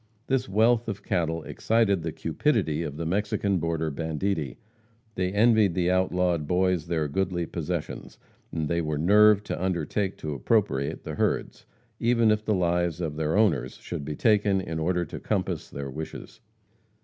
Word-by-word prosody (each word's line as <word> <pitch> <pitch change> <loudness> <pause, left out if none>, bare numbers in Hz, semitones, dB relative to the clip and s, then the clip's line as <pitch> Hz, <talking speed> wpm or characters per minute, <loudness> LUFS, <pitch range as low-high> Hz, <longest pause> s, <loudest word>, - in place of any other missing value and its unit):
This 130 -4 0
wealth 115 +3 +3
of 100 -3 -5
cattle 80 -2 -1
excited 110 -5 +1
the 80 0 -3
cupidity 75 0 0
of 75 -3 -5
the 85 - -3
Mexican 100 +1 0
border 80 -1 -1
banditti. 80 -1 -2 0.6
They 90 -2 -1
envied 105 -3 +4
the 90 0 +2
outlawed 90 -4 +1
boys 90 -2 +1
their 80 -3 0
goodly 90 +2 -1
possessions; 85 -1 -5 0.3
and 80 -2 -2
they 85 +2 0
were 75 -2 -2
nerved 105 +5 +5
to - - -4
undertake 95 +2 -1
to 75 -1 -4
appropriate 70 - 0
the - - -5
herds, - - -2 0.3
even 115 -1 +3
if 105 0 +1
the 110 -1 +1
lives 85 -2 0
of 80 -4 -3
the 80 0 -1
owners 80 - +2
should - - -6
be 75 +1 -4
taken 105 -2 +3
in 85 -4 -4
order 90 +2 0
to - - -8
compass - - -2
their 70 -1 -6
wishes. 80 +9 -8
90 Hz, 160 wpm, -26 LUFS, 80-100 Hz, 0.6 s, nerved